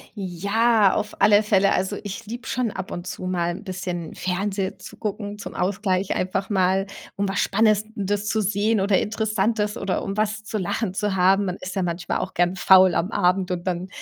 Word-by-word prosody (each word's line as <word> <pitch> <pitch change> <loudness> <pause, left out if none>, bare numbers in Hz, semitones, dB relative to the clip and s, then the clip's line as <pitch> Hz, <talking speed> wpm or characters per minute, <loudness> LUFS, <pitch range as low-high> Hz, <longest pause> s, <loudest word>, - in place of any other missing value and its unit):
Ja, 200 +3 +2
auf 210 - -3
alle 210 0 +6
Fälle 200 -2 +3
also, 190 +2 -1
ich 205 +2 -7
liebe 240 +3 -7
schon 250 -2 0
ab 190 -2 -6
und 175 +1 -6
zu - - -6
mal 175 -2 0
'n 200 - -10
bisschen 180 -3 -5
Fernsehen 190 +1 -2
zu - - -11
gucken 205 -1 -4
zum - - -8
Ausgleich, 190 0 0
einfach 190 +2 -2
mal, 190 0 +2 0.3
um 200 0 -1
was 195 - -1
Spannendes 210 -1 +1
zu 220 - +1
sehen 210 +2 +1
oder 195 0 +3
Interessantes 215 0 0
oder 195 -1 -2
um 195 - -4
was 215 +1 -1
zu 215 0 -3
lachen 190 +2 -2
zu 205 0 -1
haben. 190 +2 +4
Man 180 -2 -2
ist 185 - -6
ja 195 - 0
manchmal 180 0 -2
auch 190 - -5
gern 175 +1 +2
faul 185 -1 +6
am 175 +3 0
Abend 185 -2 +1
und 175 -1 -3
dann, 180 0 -2
195 Hz, 195 wpm, -23 LUFS, 185-210 Hz, 0.3 s, alle